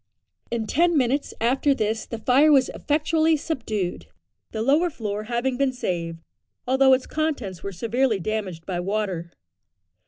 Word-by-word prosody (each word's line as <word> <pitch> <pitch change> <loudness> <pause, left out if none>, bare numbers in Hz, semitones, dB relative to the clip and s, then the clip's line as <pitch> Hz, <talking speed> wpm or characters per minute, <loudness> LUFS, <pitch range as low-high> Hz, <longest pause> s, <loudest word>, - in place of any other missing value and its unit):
In 235 -2 -2
ten 335 +7 +2
minutes 270 +2 +1
after 270 +4 +2
this 220 -2 -1
the 230 - -5
fire 265 +7 +4
was 270 -3 +5
effectually 315 +1 +1
subdued, 220 - -3 0.4
the 220 0 -3
lower 300 +8 +3
floor 215 -6 -4
having 245 +2 -1
been 275 -1 +1
saved, 170 -8 -3 0.4
although 265 +1 +5
its 260 0 +2
contents 275 - -3
were 200 - -5
severely 230 +4 0
damaged 190 -4 -4
by 180 -2 -3
water. 185 -3 -2
235 Hz, 145 wpm, -24 LUFS, 205-275 Hz, 0.4 s, was